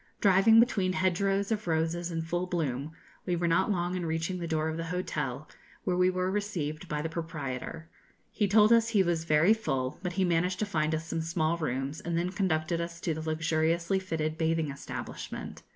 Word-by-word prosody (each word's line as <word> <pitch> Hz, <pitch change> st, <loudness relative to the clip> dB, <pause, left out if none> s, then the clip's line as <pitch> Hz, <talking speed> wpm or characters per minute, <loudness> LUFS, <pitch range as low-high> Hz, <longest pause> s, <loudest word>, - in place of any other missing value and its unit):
Driving 200 Hz, +2 st, +6 dB
between 200 Hz, -6 st, +3 dB
hedgerows 195 Hz, +2 st, +1 dB
of 215 Hz, -3 st, -1 dB
roses 165 Hz, +1 st, 0 dB
in 165 Hz, -1 st, -2 dB
full 175 Hz, +2 st, -2 dB
bloom, 150 Hz, -5 st, -2 dB, 0.4 s
we 180 Hz, -, +1 dB
were 170 Hz, 0 st, 0 dB
not 165 Hz, +4 st, +2 dB
long 175 Hz, -3 st, 0 dB
in 180 Hz, -, -2 dB
reaching 165 Hz, +3 st, -2 dB
the 170 Hz, -, -3 dB
door 155 Hz, -1 st, 0 dB
of 160 Hz, -, -2 dB
the 165 Hz, 0 st, -3 dB
hotel, 180 Hz, +2 st, -3 dB, 0.4 s
where 180 Hz, -3 st, 0 dB
we 180 Hz, 0 st, +4 dB
were 185 Hz, 0 st, 0 dB
received 175 Hz, -7 st, -3 dB
by 150 Hz, 0 st, -2 dB
the -, -, -1 dB
proprietor. 160 Hz, -2 st, -5 dB, 0.4 s
He 205 Hz, -, +1 dB
told 210 Hz, +3 st, +6 dB
us 230 Hz, -1 st, +4 dB
he 210 Hz, -4 st, +4 dB
was 170 Hz, -2 st, 0 dB
very 160 Hz, +6 st, +5 dB
full, 135 Hz, -, -2 dB
but 180 Hz, -1 st, -3 dB
he 190 Hz, +1 st, +1 dB
managed 180 Hz, +2 st, +1 dB
to 215 Hz, -, 0 dB
find 160 Hz, -5 st, 0 dB
us 160 Hz, +1 st, -4 dB
some 165 Hz, 0 st, -2 dB
small 165 Hz, 0 st, 0 dB
rooms, 140 Hz, -2 st, -3 dB
and 170 Hz, -1 st, -2 dB
then 175 Hz, +2 st, 0 dB
conducted 170 Hz, -3 st, 0 dB
us 170 Hz, 0 st, -5 dB
to 165 Hz, -, 0 dB
the 160 Hz, -, -5 dB
luxuriously 160 Hz, +3 st, +1 dB
fitted 160 Hz, -4 st, -3 dB
bathing 160 Hz, -2 st, +1 dB
establishment. 140 Hz, -, -7 dB
170 Hz, 200 wpm, -29 LUFS, 160-185 Hz, 0.4 s, Driving